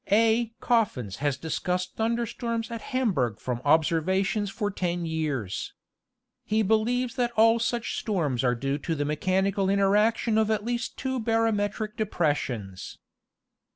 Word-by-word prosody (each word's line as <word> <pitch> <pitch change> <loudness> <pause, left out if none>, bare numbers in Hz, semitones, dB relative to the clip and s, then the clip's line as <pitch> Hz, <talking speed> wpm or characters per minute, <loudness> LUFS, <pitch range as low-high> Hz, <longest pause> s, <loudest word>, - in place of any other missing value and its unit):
A. 225 +2 +3
Croffins 165 - 0
has 145 -2 0
discussed 180 +4 -2
thunder 230 +1 0
storms 230 0 -3
at 230 -1 -5
Hamberg 165 - 0
from 125 -2 -3
observations 185 +7 +2
for 205 +1 -2
ten 175 -2 -2
years. 145 - -3 0.7
He 215 +1 +1
believes 235 +4 +1
that 245 -1 +2
all 225 +1 +5
such 230 0 -1
storms 155 - -1
are 125 -1 +2
due 135 +4 -2
to 165 +3 -2
the 145 -1 -1
mechanical 190 +6 +1
interaction 210 +3 +3
of 220 -1 +2
at 215 -1 0
least 240 +1 -3
two 260 -1 -2
barometric 220 -2 0
depressions. 140 - -2
205 Hz, 135 wpm, -27 LUFS, 155-225 Hz, 0.7 s, all